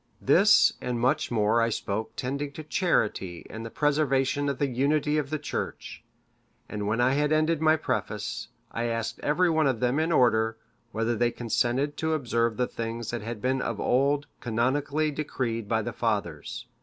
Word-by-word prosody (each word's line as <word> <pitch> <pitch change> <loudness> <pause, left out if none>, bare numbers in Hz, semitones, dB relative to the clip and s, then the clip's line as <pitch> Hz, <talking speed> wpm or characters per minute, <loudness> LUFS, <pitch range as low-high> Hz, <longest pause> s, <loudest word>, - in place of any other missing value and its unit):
This 195 +10 +5
and 125 -1 -2
much 125 +2 +1
more 110 0 +2
I 115 - +2
spoke 110 0 -3
tending 140 +3 -3
to 155 - -7
charity 105 - 0
and 110 +1 -6
the 115 - -6
preservation 145 0 +1
of 140 - -2
the 145 - +1
unity 145 +4 +1
of 140 -2 -3
the 155 - -1
Church; 150 0 -5 0.6
and 105 -1 -4
when 110 +3 0
I 125 +1 +4
had 150 +1 +1
ended 155 0 +2
my 155 0 +5
preface, 155 - -3 0.2
I 115 - -2
asked 115 -1 -2
every 170 +4 +2
one 160 -2 +3
of 130 -4 0
them 125 +4 +1
in 160 +2 +1
order, 115 -5 +3 0.3
whether 115 +1 0
they 120 +2 +2
consented 120 +5 -1
to 160 0 0
observe 115 -6 0
the 125 - +2
things 115 -1 -5
that 120 -2 -3
had 110 -1 -6
been 130 0 +1
of 115 -4 -3
old 140 +3 +2
canonically 140 +6 0
decreed 120 -7 -3
by 110 -1 +1
the - - -4
fathers? 110 +1 -2
125 Hz, 180 wpm, -27 LUFS, 115-145 Hz, 0.6 s, This